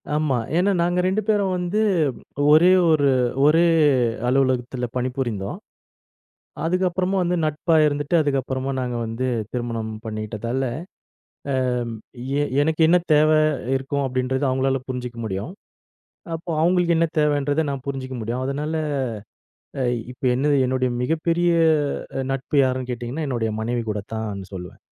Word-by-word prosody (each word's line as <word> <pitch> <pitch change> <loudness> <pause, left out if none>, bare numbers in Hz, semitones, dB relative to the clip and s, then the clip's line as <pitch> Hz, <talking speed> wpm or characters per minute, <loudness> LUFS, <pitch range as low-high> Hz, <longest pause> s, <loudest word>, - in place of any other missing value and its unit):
ஆமா. 150 -4 +1 0.2
ஏனா 190 +3 +3
நாங்க 175 +1 +1
2 195 +3 +1
பேரும் 200 -3 +2
வந்து 180 +4 -1 0.7
ஒரே 165 +4 +7 0.2
ஒரு 145 -3 +3 0.4
ஒரே 165 +3 +5 0.6
அலுவலகத்தில 125 -1 +1
பணிபுரிந்தோம். 125 - -3 1.1
அதுக்கப்புறமா 180 +2 0
வந்து 180 0 0
நட்பா 155 +2 0
இருந்துட்டு 145 +2 -1
அதுக்கப்புறமா 135 -2 -1
நாங்க 125 -1 -2
வந்து 115 +3 -3 0.3
திருமணம் 115 -3 -3
பண்ணிக்கிட்டதால. 110 +3 -3 0.9
ஆ - - 0 0.9
ஏ - - +2 0.2
எனக்கு 160 +1 0
என்ன 180 +2 +6 0.2
தேவ 155 +1 +5 0.5
இருக்கும் 140 +1 -2
அப்டின்றத 130 +2 -1
அவங்களால 130 +1 +1
புரிஞ்சுக்க 125 -2 -5
முடியும் 100 - -4 0.8
அப்போ 165 +2 -6
அவங்களுக்கு 175 0 +3
என்ன 165 - +3
தேவன்றத 145 0 +2
நான் 140 -2 -5
புரிஞ்சிக்க 130 -1 -4
முடியும். 120 +4 -3
அதனால 145 +4 -2 1.1
அ - - +1
இ - - -3
இப்ப 125 - -12
என்னது 145 +3 +2
என்னுடைய 130 0 0
மிகப்பெரிய 165 +4 +1 0.7
அ - - 0
நட்பு 135 +2 -3
யாருன்னு 130 -1 -1
கேட்டிங்கன்னா 125 +6 -4
என்னுடைய 115 -4 -1
மனைவி 120 +2 -1
கூட 105 -1 -2
தான்னு 105 -3 -4
சொல்லுவேன். 90 -1 -8
135 Hz, 130 wpm, -22 LUFS, 125-160 Hz, 1.1 s, ஒரே